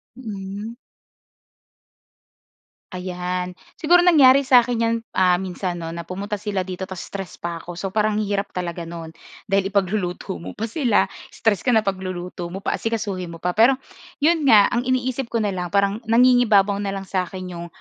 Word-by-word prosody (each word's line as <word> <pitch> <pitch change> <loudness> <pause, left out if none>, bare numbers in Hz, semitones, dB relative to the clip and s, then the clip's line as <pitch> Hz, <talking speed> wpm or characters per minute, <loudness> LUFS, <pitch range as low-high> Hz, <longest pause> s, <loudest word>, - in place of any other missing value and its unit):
Hmm. 210 -2 -6 2.2
Ayan. 180 0 -4 0.2
Siguro 350 +3 +5
nangyari 280 -6 +6
sa'kin 245 -2 +4
'yan, 230 0 +2 0.2
ah, 180 -1 +4
minsan, 180 -1 -4
'no, 165 -1 -5
na 170 - -5
pumunta 200 +5 -4
sila 200 -2 -2
dito 185 0 -5
ta's 190 -2 -6
stress 195 -2 -7
pa'ko. 170 0 -5
So, 195 - -3
parang 215 0 +2
ang 215 - 0
hirap 200 0 -2
talaga 175 -1 -4
no'n, 165 -1 -7 0.4
dahil 195 0 +2
ipagluluto 190 - -1
mo 90 +2 -7
pa 225 - -2
sila, 245 -6 +2 0.2
stress 215 -3 0
ka 250 - +2
na 220 - +5
pagluluto 180 -2 -4
mo 195 - -5
pa, - - -1
asikasuhin 205 -6 -3
mo 165 - -10
pa. 180 0 -1
Pero, 240 +4 +5 0.4
'yon 320 +1 +3
nga 215 -6 +7
ang 240 +1 0
iniisip 255 -1 -1
ko 230 - +1
na 210 - 0
lang 180 -1 -3
parang 200 +2 +2
nangingibabaw 225 -4 +4
na 195 -1 -2
lang 195 0 -5
sa'kin 185 0 -3
'yong 170 0 -6
195 Hz, 170 wpm, -22 LUFS, 180-230 Hz, 2.2 s, nga